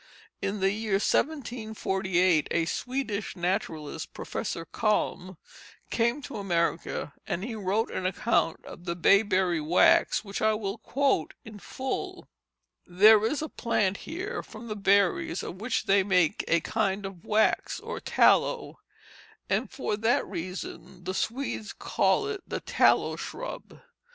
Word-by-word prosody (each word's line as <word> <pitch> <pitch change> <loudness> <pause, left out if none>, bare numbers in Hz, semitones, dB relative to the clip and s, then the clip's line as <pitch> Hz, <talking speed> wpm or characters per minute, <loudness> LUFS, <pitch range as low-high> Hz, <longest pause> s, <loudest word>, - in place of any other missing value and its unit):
In 200 0 -2
the 195 0 +3
year 215 0 -3
1748 195 - +1
a 170 -1 +1
Swedish 225 0 -3
naturalist, 165 -4 -3
Professor 165 -6 -4
Kalm, 185 -2 -1 0.5
came 235 +5 +1
to 260 - -6
America, 170 -6 -1
and 180 - -2
he 235 +1 -4
wrote 215 +2 -1
an 185 - -1
account 185 -3 0
of 175 - -11
the 170 -1 -2
bayberry 185 -2 +3
wax 170 +6 +4
which 200 0 -5
I 220 0 +3
will 210 0 -4
quote 270 - 0
in 215 -1 -10
full: 260 +6 -5 0.6
"There 210 +4 +6
is 290 +7 0
a - - -3
plant 205 -8 0
here 370 +6 -5
from 230 +1 -11
the 215 - -3
berries 200 -3 +2
of 185 - -7
which 235 +2 0
they 195 0 +4
make 180 -4 +2
a 170 0 +3
kind 200 0 -1
of 195 -3 -8
wax 215 +1 +1
or - - -6
tallow, - - +2 0.7
and - - +1
for 255 - -2
that 225 +3 +2
reason 180 0 -7
the 185 +1 -3
Swedes 230 0 -3
call 420 - +1
it 415 -2 -4
the - - -3
tallow - - +3
shrub. - - -7
200 Hz, 140 wpm, -28 LUFS, 180-225 Hz, 0.7 s, There